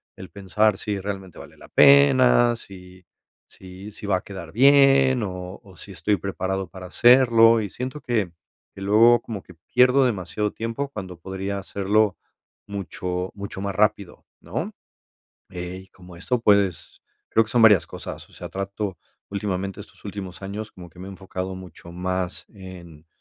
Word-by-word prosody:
el 95 - -10
pensar 100 +1 +1
si 105 -1 -3
realmente 95 -2 -6
vale - - -13
la - - -14
pena, 130 -4 +6
si 90 -4 -13 0.4
si 95 +2 -12
si 105 - -11
va 100 - +2
a - - -7
quedar 95 -5 -9
bien 135 +2 +5
o 90 -1 -6
o 95 -3 -17
si 100 - -11
estoy 95 +3 0
preparado 95 +1 -3
para 90 +1 -10
hacerlo, 115 0 +5
y 105 - -4
siento 130 +8 -6
que 110 -7 -1 0.4
que 95 - -12
luego 115 +4 +5
como 110 -5 -7
que 90 - -15 0.2
pierdo 125 +2 +5
demasiado 105 -2 -2
tiempo 115 +5 -4
cuando 95 -8 -8
podría 95 +2 -4
hacerlo 100 +1 0 0.5
mucho 90 -2 -4
mucho 100 -1 -7
más 100 -1 -3
rápido, 105 -2 0 0.2
¿no? - - -4 0.8
Eh, 90 +1 -7
y - - -26
como 90 -1 -15
esto, 125 +8 -1
pues, 100 -5 +1 0.3
creo 115 - +4
que - - -12
son 120 - +3
varias 105 -5 +6
cosas, - - -9
o - - -23
sea, - - -8
trato 100 0 -4 0.3
últimamente 100 -1 -3
estos - - -14
últimos 95 -3 -7
años 100 +2 -6
como 90 -2 -12
que 90 - -18
me 95 - -8
enfocado 95 -1 -6
mucho 90 -2 -12
más 90 0 -3
en 90 -6 -12
100 Hz, 165 wpm, -23 LUFS, 95-110 Hz, 0.8 s, pena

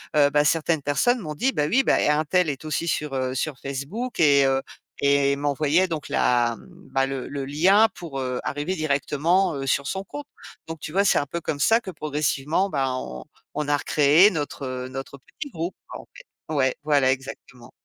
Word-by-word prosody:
heu, 145 -1 +5
bah, 145 +1 +2
certaines 160 0 +1
personnes 195 - +1
m'ont 155 -7 -6
dit: 260 - +1
«Bah, 150 - 0
oui, 260 - +3
bah, - - +3 0.2
un 155 - +1
tel 180 +1 +1
est 140 0 -5
aussi 155 +2 -2
sur, 150 -3 -2
heu, 130 0 -2
sur 135 +1 -3
Facebook» 145 - -5
et 140 -3 +5
heu, 135 0 +2 0.4
et 140 0 +3
m'envoyait 145 +5 +1
donc 155 -3 -4
la, 120 -1 +2
mmh, - - -16 0.3
bah, 135 0 +2
le 135 -1 -4
le 140 -1 -5
lien 185 +11 +4
pour, 165 -6 -7
heu, 125 -1 -2
arriver 145 +6 -2
directement, 155 +4 +1
heu, 135 -1 -4
sur 140 +1 +1
son 190 0 -3
compte. 290 +6 -8 0.4
Donc 165 -1 -7
tu 150 - -7
vois, 200 +2 +3
c'est - - +3
un 145 - +1
peu 170 +5 -5
comme 145 -2 -3
ça 225 +10 +4
que 190 - -7
progressivement, 155 +3 -1
bah, 135 -5 -1
on 65 - -6 0.3
on 150 -1 -3
a 145 - +3
recréé 150 +6 +5
notre, 145 -4 -4
heu, 130 0 -4
notre 135 +1 -7
petit 285 - -9
groupe, 170 0 -4
quoi, - - -7
en - - -24
fait. - - -13 0.3
Ouais, 130 -2 +2
voilà 145 -3 +3
exactement. 130 -2 -7
145 Hz, 210 wpm, -24 LUFS, 135-170 Hz, 0.4 s, heu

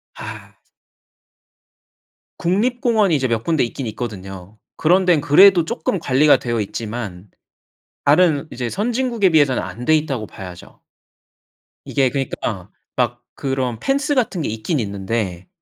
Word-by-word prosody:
아. - - -9 1.8
국립공원이 215 - +1
이제 135 -2 +1
몇 115 -2 -1
군데 160 -3 +1
있긴 120 +1 -4
있거든요. 100 -3 -7 0.2
그런 180 +4 +3
데는 175 -5 +4
그래도 175 +4 +6
쪼끔 165 +3 -2
관리가 145 0 +4
되어 120 -2 -2
있지만 105 -3 -6 0.8
다른 155 0 +4
이제 120 -1 -4
선진국에 230 - +1
비해서는 145 -5 +3
안 120 - -7
돼 155 - +4
있다고 135 -8 -2
봐야죠. 90 -3 -11 1.0
이게 135 -2 +1
그니까 115 -8 -4 0.3
막 120 -1 -1
그런 130 -4 -2
펜스 280 +1 0
같은 220 -9 0
게 - - -2
있긴 115 +8 -2
있는데 100 -3 -3
135 Hz, 275 characters per minute, -20 LUFS, 110-175 Hz, 1.8 s, 그래도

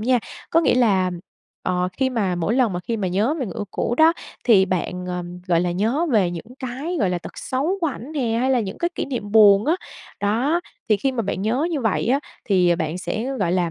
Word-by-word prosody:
nha. 250 +3 +3 0.3
Có 330 - +4
nghĩa 310 - +3
là, 195 -7 +3 0.5
ờ, 180 0 0
khi 260 +6 0
mà 200 -7 0
mỗi 175 +6 0
lần 245 -6 +2
mà 175 - -3
khi 230 +5 -3
mà 190 -3 -1
nhớ 210 - +1
về 255 - -1
người - - -7
yêu 205 - -2
cũ 240 - -1
đó, 320 +1 +7 0.3
thì 205 -6 +6
bạn, 180 0 -3
ờm, 180 0 -5
gọi 170 -2 +3
là, 175 0 0
nhớ 230 - 0
về 190 -5 +3
những 200 +8 -8
cái, 270 +7 -4
gọi 190 -3 +2
là, 180 - -1
tật - - -10
xấu 295 +10 -1
của 330 - +1
ảnh 275 +1 -6
nè 240 -6 0
hay 260 +1 +1
là 255 -3 +3
những 195 -2 -5
cái 345 - 0
kỷ - - -2
niệm 225 -6 -5
buồn 205 -2 +7
á. 320 - +4 0.5
Đó, 245 +12 +1 0.3
thì 215 - +4
khi 265 +6 0
mà 235 -3 -1
bạn 195 -1 -3
nhớ 250 +9 +1
như 300 -5 -1
vậy 220 -3 0
á, 270 +4 +2 0.2
thì 180 -4 +3
bạn 165 +1 -2
sẽ, 220 +4 -3
gọi 175 -5 +1
là, 180 -2 +1
215 Hz, 245 wpm, -22 LUFS, 185-260 Hz, 0.5 s, đó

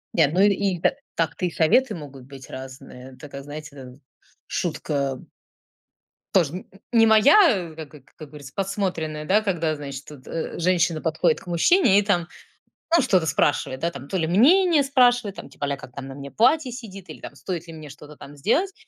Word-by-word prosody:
Ни 165 - +3
одной 175 +7 +4
и 195 -3 -1
та - - +2 0.2
так-то 165 +2 -1
и 175 - -1
советы 215 +11 +2
могут 140 -6 -10
быть 135 -1 -12
разные. 130 0 -10
Такая, 140 -2 -9
знаете, 150 0 -9
дэ 130 -2 -11 0.5
шутка 140 -3 -2 1.2
тоже 165 -7 +3
н 185 - -7 0.3
не 225 -1 +5
моя, 220 - +5
как 155 -1 -9
э 145 - -14 0.2
как 155 - -10
говорится, 140 -2 -11
подсмотренная, 180 -6 -3
да, 195 +7 +3
когда, 170 -6 -1
значит, 140 -1 -7
тут, 145 -4 -13
э, 165 +1 -5
женщина 170 -2 +1
подходит 160 0 +1
к - - -18
мужчине 200 - +4
и - - +5
там, 180 -5 0 0.7
ну, 335 - +4
что-то 185 -9 +2
спрашивает, 135 -3 0
да, 170 +1 0
там 135 -2 -10
то 190 - -2
ли 165 - 0
мнение 310 - +5
спрашивает, 245 -6 +2
там - - -10
типа - - -5
а-ля 140 -1 -2
"Как 125 - -13
там 135 -1 -7
на 135 - -9
мне 140 0 -9
платье 260 +4 +2
сидит" 200 -6 -10
или - - -12
"Стоит 175 -3 -6
ли 165 - -9
мне 155 -2 -10
что-то 150 +1 -13
там 140 +1 -12
сделать". 310 - 0
165 Hz, 190 wpm, -23 LUFS, 145-205 Hz, 1.2 s, не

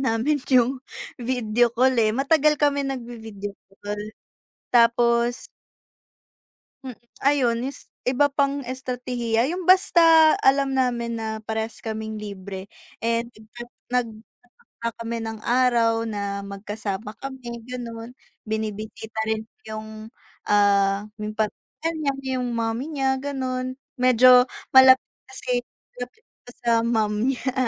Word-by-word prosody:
namin 285 +7 +1 0.2
yung 255 +1 +3 0.3
video 240 -1 +1
call, 255 +2 +3
eh, 220 -2 +3
matagal 300 +3 +3
kami 285 -1 +2
nagvi-video 225 -6 -6 0.2
call 205 0 -4 0.7
tapos 235 0 +3 1.4
Hmm, 255 -3 -8 0.2
ayun 255 -4 +2
es 275 +1 -7 0.2
iba 265 +3 +3
pang 280 0 0
estratehiya 250 -2 -1
yung 360 +3 -3
basta 330 -3 +6
alam 270 0 +3
namin 240 -2 0
na 220 -1 -4
parehas 220 +1 -4
kaming 220 -1 -5
libre, 195 -2 -7 0.3
eh, 230 0 0
nagta 235 0 -13 0.3
nagtatakda 230 -3 -4 0.6
kami 230 0 -3
ng 225 -1 -5
araw 235 -2 +2
na 200 -2 -4
magkasama 205 +1 -5
kami 260 -3 -7
gano'n. 235 -1 -7 0.3
Binibisita 220 0 -5
rin 220 0 -1 0.2
yung, 220 +1 -8 0.3
ah, 200 0 +3
yung 215 0 -5
pamilya 220 +9 -3
niya, 285 -3 0 0.2
yung 250 -1 -2
mommy 230 +2 -1
niya 265 -2 +1
gano'n 260 -2 -3 0.2
medyo 250 0 +7 0.2
malapit 260 0 +7 0.2
kasi 250 -2 -3
na 245 0 -10
malapit 440 - -28 0.4
sa 235 - +1
mom 220 -3 +1 0.2
niya 260 0 -3
235 Hz, 115 wpm, -24 LUFS, 220-260 Hz, 1.4 s, medyo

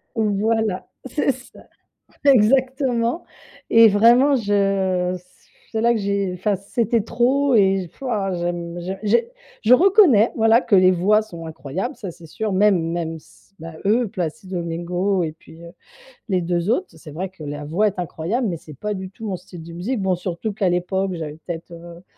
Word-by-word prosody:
Voilà, 215 -2 0 0.2
c'est 275 +2 0
ça 255 0 -14 0.6
exactement 260 +2 +3 0.5
et 230 0 +8
vraiment 240 +7 +5
je 195 -4 +1
c 180 - -19 0.5
c'est 220 - -1
là 235 +1 +4
que 225 - -1
j'ai 200 -2 -1
enfin 195 +3 0
c'était 225 +4 0
trop 255 +5 +1
et 195 -3 +3
f - - -28
waouh, 205 -8 -1
j'aime 175 0 -4
j'ai 190 +2 -5
j'ai 235 - +1 0.3
je 230 +3 +6
reconnais, 340 - +5
voilà, 225 +1 +4
que 205 - +2
les 185 -1 +6
voix 195 +4 +3
sont 170 -6 -9
incroyables, 165 - -5
ça 200 -6 -7
c'est 170 0 -12
sûr, 210 +6 -3
même 195 -2 +3
même 165 -1 -3
s 160 - -21
bah, 165 +1 -8
eux 230 +4 +2
Placido 185 0 -5
Domingo 175 +3 -1
et 155 -2 -3
puis, 160 +1 -17
heu, 170 0 -11 0.6
les 185 -3 +1
2 175 +2 -1
autres, 360 +11 +1
c'est 155 - -12
vrai 180 +5 -5
que 190 -4 -14
la 145 0 -6
voix 175 +9 +1
est 200 -1 -7
incroyable 180 +8 -2
mais 175 -5 -2
c'est 155 -1 -13
pas 210 +10 -4
du 190 -1 -6
tout 220 +3 -9
mon 195 -3 -2
style 175 -1 -12
de 170 - -10
musique. 205 +8 -3
Bon, 190 -1 +1
surtout 180 +4 -4
qu'à 200 -2 0
l'époque, 185 +2 -1
j'avais 155 -2 -6
peut-être, 170 0 -6
heu, 170 0 -11
195 Hz, 185 wpm, -21 LUFS, 175-225 Hz, 0.6 s, et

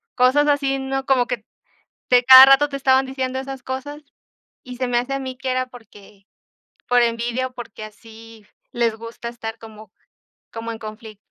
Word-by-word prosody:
cosas 265 +4 +3
así, 275 -1 0
¿no?, 270 0 -4
como 255 -3 +2
que 235 -3 -5 0.6
de 250 0 +4
cada 260 0 +11
rato 275 +2 +5
te 275 - -5
estaban 265 0 +2
diciendo 260 0 -4
esas 270 -1 -8
cosas 280 +4 -6 0.6
y 250 -1 -10
se 255 -1 -2
me 245 - 0
hace 250 +3 -4
a 275 - -2
mí 260 -1 -7
que 265 -1 -3
era 255 0 -1
porque, 210 -4 -17 0.6
por 245 0 +4
envidia 235 +2 -1
o 255 - -26
porque 220 -3 -9
así 225 0 -14 0.3
les 230 -2 0
gusta 230 +1 -9
estar 225 -1 -8
como 215 -2 -14 0.6
como 230 0 -6
en 225 - -8
confli 215 0 -10
250 Hz, 180 wpm, -21 LUFS, 225-265 Hz, 0.6 s, cada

